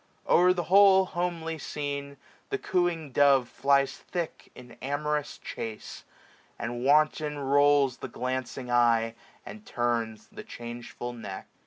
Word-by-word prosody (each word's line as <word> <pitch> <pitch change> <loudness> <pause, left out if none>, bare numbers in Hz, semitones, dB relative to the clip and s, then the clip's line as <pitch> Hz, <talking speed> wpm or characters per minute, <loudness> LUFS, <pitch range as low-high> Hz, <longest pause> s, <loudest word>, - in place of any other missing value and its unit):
O'er 180 +1 +5
the 180 -1 -1
whole 190 +1 +6
homely 170 -3 -3
scene, 140 -1 -5 0.3
the 410 - -1
cooing 175 - -1
dove 135 -2 +4
Flies 140 +1 +2
thick 170 -3 -6
in 125 -1 -13
amorous 150 +2 -2
chacc; 110 -1 -6 0.6
and 120 +1 -4
wanton 150 +1 +2
rolls 140 -1 +3
The - - -6
glancing 125 0 -4
eye, 115 -2 +3 0.3
and 215 - -10
turns 115 - -2
the - - -8
changeful 120 +1 -7
neck. 105 -5 -7
140 Hz, 125 wpm, -28 LUFS, 120-160 Hz, 0.6 s, whole